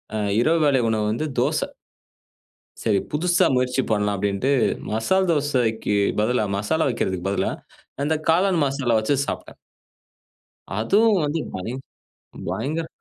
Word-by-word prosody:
அ - - 0 0.2
இரவு 165 +5 +3
வேளை 135 -3 +3
உணவு 110 -1 0
வந்து 120 +8 -2
தோசை. - - +1 1.2
"சரி, 105 -3 +2
புதுசா 175 +4 +2
முயற்சி 125 +1 +1
பண்ணலாம்." 105 -1 +1
அப்படீன்னுட்டு, 100 +7 0 0.4
மசால் 185 - +1
தோசைக்கு 125 -8 0 0.2
பதிலா, 110 0 +1
மசாலா 160 +11 0
வைக்கிறதுக்கு 95 -5 -2
பதிலா 100 - 0 0.5
அந்த 155 +2 +1
காளான் 175 -1 +3
மசாலா 135 -4 0
வச்சு 110 +6 +1
சாப்ட்டேன். - - -6 1.2
அதுவும் 215 0 +3
வந்து 150 +2 -1
பயங் 115 +8 -4 0.7
பயங்கர 145 - -2
130 Hz, 120 wpm, -23 LUFS, 110-160 Hz, 1.2 s, இரவு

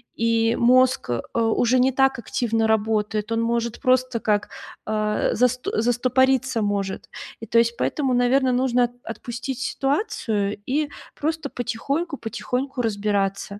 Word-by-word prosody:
и 230 0 +2
мозг, 255 - +3
э, 120 - -3
уже 230 +2 +2
не 260 +2 +4
так 270 -1 +2
активно 230 -3 0
работает, 215 0 0
он 225 - +1
может 235 0 -1
просто 255 -2 +2
как, 210 -2 0 0.4
э-э, 215 0 0
заст 250 +1 +1
застопориться 255 +1 +2
может. 200 -2 -2 0.3
И 225 - -8
то 230 - +1
есть 235 0 +3
поэтому, 270 -4 0
наверно, 255 +2 +3
нужно 250 -1 +2
от 240 - -7
отпустить 240 +3 -6
ситуацию 225 - -1
и 290 +3 0 0.3
просто 315 -1 -2
потихоньку, 275 +7 -3
потихоньку 250 +4 -3
разбираться. 200 -2 -1
235 Hz, 130 wpm, -23 LUFS, 220-260 Hz, 0.4 s, не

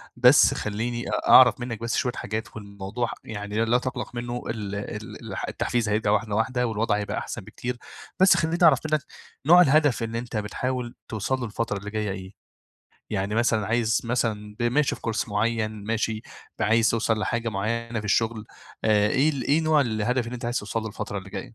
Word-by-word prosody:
بس 125 +3 +6
خليني 120 +3 -3 0.2
أعرف 130 -1 +8
منك 120 -3 -4
بس 115 0 -2
شوية 125 -3 0
حاجات 110 +1 -5
والموضوع 100 +3 -4
يعني 105 +1 -2
لا 120 +2 +3
تقلق 125 -1 -5
منه 120 0 -4
ال 105 -3 -4
ال 105 +1 -7
ال - - -3
التحفيز 120 -3 -1
هيرجع 105 0 +1
واحدة 105 -1 0
واحدة 125 +2 +1
والوضع 110 -1 0
هيبقى 105 - -3
أحسن - - -5
بكتير 125 0 -5 0.4
بس 190 +1 +6
خليني 165 +1 0
أعرف 145 -6 +7
منك، 155 -2 +2 0.4
نوع 175 +3 +8
الهدف 145 -5 +4
اللي 115 +1 -3
أنت 120 -2 -5
بتحاول 120 +3 -3
توصل 115 +5 -2
له 120 - -3
الفترة 110 -1 -2
اللي 100 +1 -7
جاية 105 -2 -2
إيه؟ 95 0 -7 0.8
يعني 100 0 -1
مثلًا 115 -3 +2
عايز 110 0 +1
مثلًا 110 -3 -2
ب - - -3
ماشي 130 +5 +2
في - - -13
كورس 115 -1 -2
معين 110 0 -1
ماشي 110 0 -1 0.4
ب - - -2
عايز 115 +1 +4
توصل 115 -1 +1
لحاجة 115 +2 -1
معينة 115 +3 -2
في 110 - -6
الشغل 110 +1 +1 0.4
آآ 105 -1 +4
إيه 140 +6 +3
ال 135 -4 -4
إيه 150 +3 +3
نوع 155 -2 +3
الهدف 120 +1 0
اللي 120 - -5
أنت 120 - -7
عايز 120 +1 0
توص 105 +2 -6
له 110 0 -1
الفترة 105 -1 -5
اللي 95 +1 -10
جاية.. 100 +4 -7
115 Hz, 190 wpm, -25 LUFS, 105-120 Hz, 0.8 s, أعرف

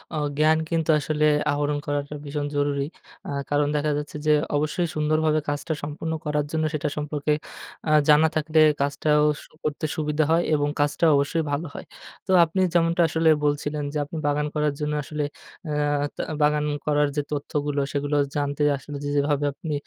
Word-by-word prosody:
আ - - -1 0.2
জ্ঞান 155 +1 +4
কিন্তু 165 -1 -1
আসলে 150 0 0 0.3
আহরণ 145 0 0
করাটা 145 0 -2
ভীষণ 145 0 -3
জরুরি। 145 -1 0 0.4
আ - - -5 0.2
কারণ 145 0 +2
দেখা 150 +1 +1
যাচ্ছে 150 0 -5
যে 155 - +5 0.2
অবশ্যই 155 +4 0
সুন্দরভাবে 155 0 +2
কাজটা 145 +3 -2
সম্পূর্ণ 155 +2 -4
করার 150 -1 0
জন্য 160 0 0
সেটা 150 0 -1
সম্পর্কে 150 0 -1 0.6
আ - - +2 0.2
জানা 150 +2 +7
থাকলে 155 0 +2 0.2
কাজটাও 150 +1 +2 0.2
স - - -13 0.2
করতে 155 0 -2
সুবিধা 150 0 0
হয় 170 +1 +4
এবং 145 0 +1
কাজটাও 145 +3 +3
অবশ্যই 155 +3 0
ভালো 155 +4 -2
হয়। - - -8 0.4
তো 190 - 0
আপনি 180 +4 -1
যেমনটা 170 0 +3
আসলে 160 0 +2 0.2
বলছিলেন 145 0 -1
যে - - -1
আপনি 155 +3 -7
বাগান 145 +1 +1
করার 150 -1 +1
জন্য 150 0 -1
আসলে 150 +1 -3 0.5
আ - - -2 0.4
তা - - -3 0.2
বাগান 150 0 +3 0.2
করার 150 -1 +2
যে 145 - +1
তথ্যগুলো, 145 0 -1
সেগুলো 145 +1 -1 0.2
জানতে 145 0 -1
আসলে 145 +1 -8
যে 145 - -2
যেভাবে 145 0 +1
আপনি 155 0 -5
150 Hz, 170 wpm, -24 LUFS, 145-155 Hz, 0.6 s, জানা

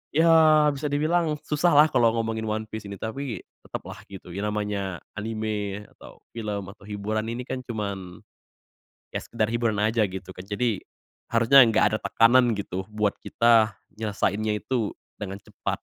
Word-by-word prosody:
Iya 155 -2 +6
bisa 140 +1 -3
dibilang 155 +2 +1
susahlah 150 -1 +4
kalau 115 -1 +3
ngomongin 110 -1 -2
One 110 0 -1
Piece 110 -2 -6
ini, 100 - -6
tapi 115 +4 -5 0.2
tetaplah - - -7
gitu 95 -3 -11
ya 100 +4 -3
namanya 105 -3 -3 0.2
anime 105 -2 -3 0.2
atau - - -14
film 105 -4 -4
atau 105 -1 -17
hiburan 105 +2 -2
ini 120 +2 -4
kan 130 - -4
cuman 100 -5 -5 0.9
ya - - +1
sekedar 110 -2 -1
hiburan 115 -2 0
aja 110 +1 +2
gitu 95 -1 -5
kan. 90 - -8
Jadi 105 +1 -1 0.5
harusnya 120 +4 +7
enggak 110 -2 +3
ada - - +1
tekanan 120 +1 +5
gitu 95 -1 -4
buat 105 -1 0
kita 115 -3 +3 0.2
nyelesainnya 105 0 -1
itu 120 -5 -1 0.3
dengan 100 -1 -5
cepat. 105 0 -4
110 Hz, 150 wpm, -25 LUFS, 105-120 Hz, 0.9 s, harusnya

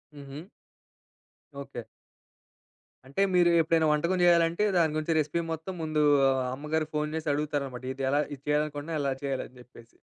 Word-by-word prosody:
హుహు. 145 +4 -9 1.1
ఓకే. 135 -4 -8 1.2
అంటే 140 +8 -3
మీరు 175 -1 +5
ఎప్పుడైనా 160 0 +2
వంటకం 170 +5 +1
చేయాలంటే, 170 +1 +4
దాని 160 -3 +2
గురించి 155 +1 0
రెసిపీ 155 +3 -1
మొత్తం 160 +4 -6
ముందు 155 -1 0 0.3
ఆహ్, 130 -1 +1
అమ్మగారుకి 155 +2 -3
ఫోన్ 150 0 -1
చేసి 160 -1 -3
అడుగుతారన్నమాట. 140 -4 -3
ఇది 135 0 -6
ఎలా 145 +2 +2
ఇది 135 - -21
చేయాలనుకుంటున్నా, 150 +1 -1
ఎలా 140 -1 0
చేయాలి 135 -2 -2
అని 125 - -21
చెప్పేసి. 120 -2 -18
150 Hz, 150 wpm, -28 LUFS, 140-160 Hz, 1.2 s, మీరు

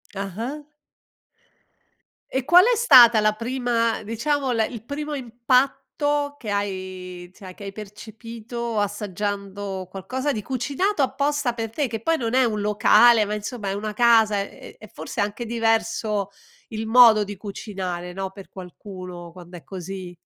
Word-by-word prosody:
Ah-ah. 225 +10 -5 1.7
E 265 -1 -1
qual 350 +4 +7
è - - +3
stata 240 - +8
la 215 0 +3
prima, 235 -1 -1
diciamo 260 +5 -1
le 225 -2 +2
il 230 -3 -9
primo 295 +3 -5
impatto 275 +4 0
che 220 - -7
hai 185 -3 -4
cioè 185 -2 -11
che 200 - -11
hai 195 - -5
percepito 225 +2 -6
assaggiando 200 -1 -4
qualcosa 260 +9 -3
di 215 - -3
cucinato 280 - -1
apposta 280 -1 0
per 225 -1 -4
te, 280 +2 -1
che 225 -1 -5
poi 330 +5 +1
non 230 -1 -3
è 260 0 +4
un 215 -2 -1
locale 215 +2 +5
ma, 210 - -3
insomma, 210 0 -5
è 195 - -1
una 210 +1 -4
casa 225 -4 +4
e 200 - -8
è 215 - -12
forse 160 -3 -8
anche 210 +4 -3
diverso 225 -3 0 0.4
il 220 -2 -5
modo 225 -3 +7
di 205 +1 -7
cucinare, 190 -3 -6
no, 190 0 -4
per 195 -1 -12
qualcuno 180 -2 -10
quando 175 0 -12
è 170 - -14
così? 185 -1 -8
220 Hz, 150 wpm, -23 LUFS, 195-245 Hz, 1.7 s, stata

